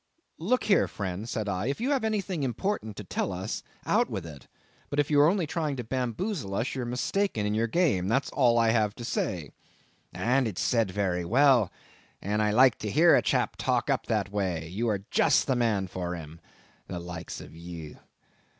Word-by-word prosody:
"Look 230 +10 +1
here, 200 -4 +3
friend," 100 +3 -5
said 110 -4 -2
I, 100 +2 -1
"if 140 - -2
you 255 +5 0
have 270 -5 +1
anything 200 -6 -1
important 130 - -2
to 105 - -6
tell 95 - -2
us, 95 +4 -4 0.2
out - - +2
with - - -4
it; 75 -6 -11 0.4
but 145 - -4
if 145 +1 +1
you 145 -1 +6
are 150 - +6
only 185 -2 +1
trying 155 -2 -2
to 125 - -4
bamboozle 125 - -2
us, 115 +5 -1
you 130 - -3
are - - -3
mistaken 125 - -1
in 105 - 0
your 115 +2 +1
game; 120 - +1
that's 135 +6 +1
all 120 -4 +3
I 115 -1 +4
have 110 -2 +1
to 120 - -7
say." 85 -9 -2 0.6
"And 125 +2 +1
it's 100 -5 -4
said 115 -5 +2
very 95 -2 -1
well, 120 +1 +4 0.5
and 105 +2 -1
I 105 - +2
like 125 +3 +5
to 105 - -3
hear 165 - +5
a - - +4
chap - - 0
talk - - 0
up - - -1
that 100 -3 0
way; 90 -6 -2
you 110 +6 -1
are 100 -2 -2
just - - +4
the 130 - +1
man 110 -5 +1
for 90 -1 -4
him—the 85 +2 -11
likes 85 -1 -7
of - - -11
ye. 85 -2 -9
110 Hz, 205 wpm, -28 LUFS, 95-140 Hz, 0.6 s, you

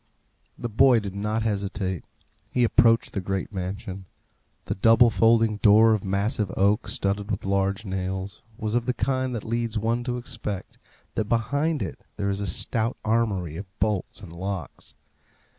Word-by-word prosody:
The 120 - -3
boy 120 +2 +5
did 100 -3 -6
not 105 +2 -1
hesitate. 100 -4 -2 0.5
He 125 - +1
approached 115 -1 +4
the 100 - -2
great 95 +2 -3
mansion. 95 +1 -5 0.6
The - - -1
double 115 +4 +5
folding 115 -1 +3
door 110 +2 +6
of 105 - -1
massive 100 +1 0
oak, 100 +4 +2
studded 100 +1 -1
with 100 -2 -3
large 100 +1 0
nails, 95 +1 -4 0.2
was 110 -3 -3
of 120 0 0
the 125 - 0
kind 130 -2 -1
that 110 - -4
leads 115 0 -2
one 115 +3 0
to 125 -1 -1
expect 115 -5 -6 0.3
that 110 - -1
behind 140 +6 0
it 95 - -6 0.2
there 100 0 0
is 100 +1 -2
a 100 - -2
stout 115 +6 0
armoury 100 -8 0
of 100 - -7
bolts 105 -3 -1
and 85 -5 -10
locks. 95 +1 -6
105 Hz, 160 wpm, -25 LUFS, 100-115 Hz, 0.6 s, door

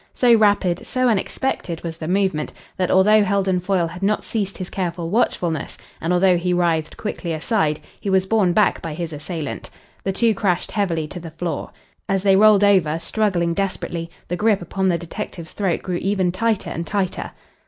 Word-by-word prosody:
So 245 -2 +5
rapid, 205 -5 +3
so 255 0 +1
unexpected 195 -4 -2
was 165 -1 -5
the 160 - -6
movement 185 -4 0 0.2
that, 185 -1 0
although 210 +3 +5
Heldon 195 -2 +1
Foyle 180 -1 +1
had 170 +2 -7
not 210 +2 +1
ceased 200 -4 -3
his 185 - -5
careful 175 -3 -3
watchfulness, 175 - 0 0.2
and 165 - -1
although 180 0 +4
he 180 +1 0
writhed 165 -3 0
quickly 180 -5 -4
aside, 155 -2 0 0.2
he 200 - -3
was 190 -1 +3
borne 195 -3 +2
back 205 +2 +2
by 160 -2 -5
his 165 -1 -4
assailant. 150 0 -5 0.3
The 195 - 0
two 225 +3 +2
crashed 190 -3 0
heavily 170 -7 -1
to 180 - -7
the 170 -1 -8
floor. 165 +2 -4 0.4
As 195 -1 +1
they 195 -1 +5
rolled 210 0 +6
over, 185 -6 +4
struggling 175 -2 0
desperately, 170 -3 -3 0.2
the 175 - -2
grip 210 +1 +2
upon 190 +3 -1
the 175 -2 +2
detective's 170 0 -7
throat 190 -5 -1
grew 180 -2 -2
ever 190 -2 +1
tighter 220 +3 -1
and 165 0 -4
tighter. 195 -3 -2
185 Hz, 185 wpm, -21 LUFS, 170-200 Hz, 0.4 s, rolled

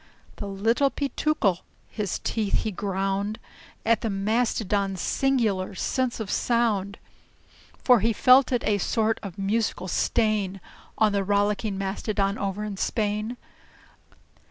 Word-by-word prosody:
The 205 - -5
Little 225 +8 +2
Peetookle, 275 - 0 0.3
his 205 -4 -3
teeth 215 -3 0
he 220 - -2
ground 195 +2 -2 0.5
At 230 -1 +3
the 225 - -1
Mastodon's 200 -2 0
singular 215 -7 0
sense 255 +4 -1
of 215 -3 -4
sound; 215 -5 +1 0.8
For 250 -3 +5
he 225 +3 +2
felt 255 +4 +5
it 245 -2 +1
a 205 -1 +1
sort 220 +3 0
of 195 -5 -8
a - - -5
musical 205 -1 -1
stain 205 -2 0 0.4
On 215 -1 +4
the 200 -1 0
Rollicking 205 +1 0
Mastodon 195 +1 -1
over 200 +1 -2
in 210 -2 -5
Spain. 215 +3 -1
210 Hz, 130 wpm, -25 LUFS, 195-230 Hz, 0.8 s, For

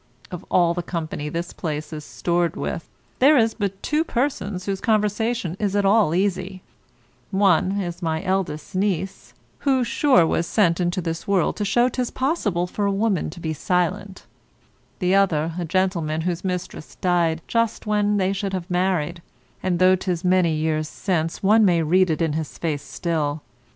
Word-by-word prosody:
Of 180 - -6
all 175 -2 +3
the 175 - -2
company 160 -4 -4
this 170 +3 -4
place 155 -1 -4
is 150 -1 -6
stored 170 +2 -1
with, - - -4 0.3
there 285 +3 +6
is 225 -2 +3
but 200 -3 -4
two 300 +1 +1
persons 235 - -2
whose 195 -1 -2
conversation 215 -3 0
is 205 -2 -1
at 205 -1 +2
all 195 -5 +4
easy; 185 0 -1 0.7
one 190 0 +2
is 175 -2 -4
my 160 -2 -1
eldest 190 -2 -2
niece, 190 -1 -2 0.2
who, 265 -3 +2
sure, 250 - +4
was 170 +1 0
sent 175 -6 +2
into 175 +1 0
the 165 -1 -2
world 195 -4 +2
to 210 - -1
show 240 +4 +3
'tis 250 -1 -2
possible 245 - 0
for 200 +3 -2
a - - +1
woman 200 -2 0
to 155 - -10
be 160 -1 -3
silent; 185 +5 -2 0.7
the 180 -1 +1
other, 165 -5 +2
a 175 - -2
gentleman 170 -3 0
whose 175 0 -2
mistress 180 -4 -5
died 170 -3 +1
just 230 -1 0
when 210 -1 +1
they 190 0 +1
should 195 0 -3
have 185 0 -4
married; 175 -2 0 0.4
and 185 -2 0
though 185 +1 +5
'tis 180 -2 -3
many 180 -3 +3
years 155 0 -1
since, 165 -3 -2
one 215 +3 +5
may 175 -4 +3
read 180 +4 +3
it 160 +1 0
in 160 -2 0
his 155 -1 -4
face 155 -4 -2
still. 150 -1 -2
185 Hz, 175 wpm, -23 LUFS, 165-200 Hz, 0.7 s, there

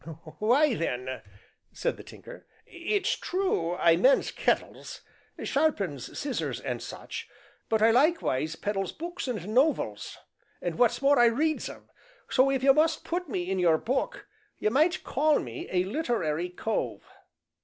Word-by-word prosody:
"Why 255 +6 +4
then," 130 - -3 0.5
said - - -1
the - - -11
Tinker, - - -13 0.2
"it's 380 +3 -1
true 355 - -1
I 170 -2 +4
mends 260 +9 +4
kettles, - - -2 0.4
sharpens 200 - -1
scissors 275 -3 -3
and - - -4
such, - - -7 0.4
but 220 -1 +2
I 225 - +6
likewise 235 - +2
peddles 195 0 -2
books 345 -1 -6
an' 215 -4 -4
nov 280 +5 +4
els, 105 -1 -6 0.4
an' 175 -2 -4
what's 245 +2 +2
more 280 0 +5
I 240 - +7
reads 305 +7 0
'em - - -12 0.4
so, 260 +1 +4
if 270 -1 0
you 270 0 +7
must 315 +2 +2
put 350 -1 -3
me 180 -6 -2
in 190 - 0
your 170 -3 +4
book, 265 - -2 0.3
you 215 - 0
might 315 +8 +2
call 300 +2 +2
me 120 -1 -6
a 180 -1 +2
literary 185 - -1
cove." 220 +5 -3
240 Hz, 150 wpm, -28 LUFS, -, 0.5 s, I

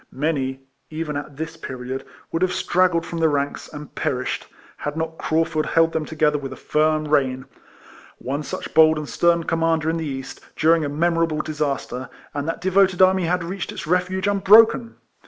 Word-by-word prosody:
Many, 135 -2 -2 0.3
even 155 -1 -4
at 145 -1 -6
this 160 +1 -5
period, 130 -3 -6 0.3
would 165 - -2
have 185 0 +2
straggled 175 -2 +2
from 170 - -5
the 160 -1 +3
ranks, 145 -1 -2
and 150 -1 -9
perished, 125 -1 -2 0.3
had 145 +1 -4
not 160 0 -3
Craufurd 155 -1 0
held 165 0 +3
them 155 - -1
to 160 - -9
gether 150 -1 +2
with 135 -1 -6
a - - -6
firm 155 +1 +1
rein. 130 -3 +1 0.7
One 140 +4 -3
such - - -6
bold 160 0 +6
and 150 -1 -4
stern 170 +2 +2
commander 165 -1 +1
in 165 - -2
the 160 -1 -3
East, 135 -1 -6
during 160 0 +3
a 145 - -2
memorable 165 +1 +1
disaster, 140 -4 -3 0.2
and 145 +1 -3
that 165 - -3
devoted 190 0 +3
army 185 -1 +5
had 180 +1 0
reached 180 +2 -5
its - - -7
refuge 180 +3 0
unbroken 215 +4 +5
160 Hz, 180 wpm, -22 LUFS, 145-170 Hz, 0.7 s, bold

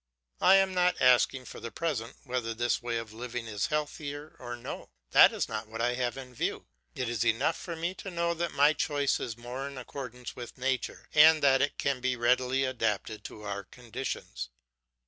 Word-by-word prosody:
I 190 - +7
am 195 -1 +4
not 180 0 +2
asking, 130 +1 +4
for - - -9
the 115 - -6
present, 130 -5 -3
whether 125 -3 -2
this 120 +1 +1
way 120 -1 -2
of 115 -2 -6
living 120 +1 -5
is 105 -3 -1
healthier 150 0 -4
or 120 0 -5
no; 120 - -7 0.2
that - - +8
is - - -1
not 110 0 -4
what 115 +1 -7
I 120 +1 +2
have 125 0 -1
in 130 -2 -8
view. - - -2 0.3
It 125 - -2
is 115 -3 0
enough 135 +8 +2
for 170 - -6
me 170 +3 -2
to 195 - -7
know 170 -1 0
that 170 0 -2
my 145 +2 +5
choice 145 -3 +1
is 115 -1 -4
more 125 +3 -5
in 140 -1 -8
accordance 125 -1 -7
with 120 +1 -8
nature, 130 -1 -2
and 155 0 +7
that 135 -1 +5
it 145 - 0
can 140 -2 0
be 130 0 +1
more 120 - -10
readily 130 +2 +3
adapted 110 -4 -1
to 105 - -9
other 100 -1 -3
conditions. 120 - -6
125 Hz, 205 wpm, -30 LUFS, 120-145 Hz, 0.3 s, that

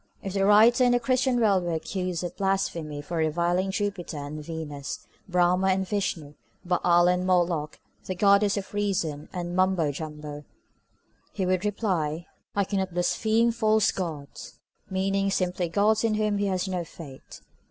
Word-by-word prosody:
If 195 - -4
the 195 -1 +1
writer 225 +4 +6
in 245 -1 +4
the 245 - +3
Christian 255 +1 +1
World 200 -5 +3
were 175 -1 -2
accused 180 +1 -3
of 175 - -5
blasphemy 170 -7 -2
for 170 +4 -4
reviling 170 +4 +1
Jupiter 195 -5 -3
and 145 +1 -6
Venus, 150 -3 -6 0.2
Brahma 180 +1 +3
and 190 0 +1
Vishnu, 175 -7 -2 0.3
Baal 175 -1 +3
and 180 0 +2
Moloch, 175 -4 0 0.3
the 185 - -3
Goddess 200 +2 +4
of 195 0 -6
Reason 185 -8 -2
and 175 -1 -4
Mumbo 185 -5 +2
Jumbo, 150 0 -7 0.9
he 190 - -1
would 185 0 +1
reply, 175 -7 -1 0.3
I 200 - +3
cannot 190 -2 -2
blaspheme 220 +6 +2
false 220 -2 +2
gods, 155 -6 -6 0.3
meaning 195 +1 0
simply 180 -2 -1
gods 210 +5 +2
in 225 -2 +2
whom 210 -1 0
he 200 - +1
has 185 0 -1
no 180 -2 -2
faith. 150 -5 -12
185 Hz, 155 wpm, -26 LUFS, 165-200 Hz, 0.9 s, writer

